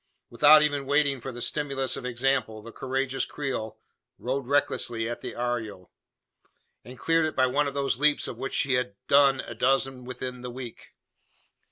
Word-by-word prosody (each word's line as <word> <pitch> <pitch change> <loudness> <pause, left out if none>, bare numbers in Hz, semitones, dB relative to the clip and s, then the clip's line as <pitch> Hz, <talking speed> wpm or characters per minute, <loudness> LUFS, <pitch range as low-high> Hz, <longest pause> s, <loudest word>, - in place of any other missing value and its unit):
Without 150 +6 +7
even 145 -2 0
waiting 140 -2 +2
for 135 - -5
the 120 0 -5
stimulus 140 -3 -1
of 125 - -5
example, 120 -3 -1
the 115 - -10
courageous 135 +1 -2
Creole 130 -7 -4 0.4
rode 130 +1 -3
recklessly 120 -5 0
at 120 - -5
the - - -6
arroyo; 115 -6 -4 0.9
and 125 +3 -11
cleared 165 +4 +2
it 155 - -5
by 130 - +4
one 140 +3 +1
of 140 - -5
those 135 -3 0
leaps 150 0 +3
of - - -5
which 135 - -3
she 135 - +2
had 125 -5 0
"done 140 -2 +5
a - - -8
dozen 135 +2 0
within 125 0 -6
the 125 - -6
week." 125 -1 -9
130 Hz, 175 wpm, -27 LUFS, 120-140 Hz, 0.9 s, Without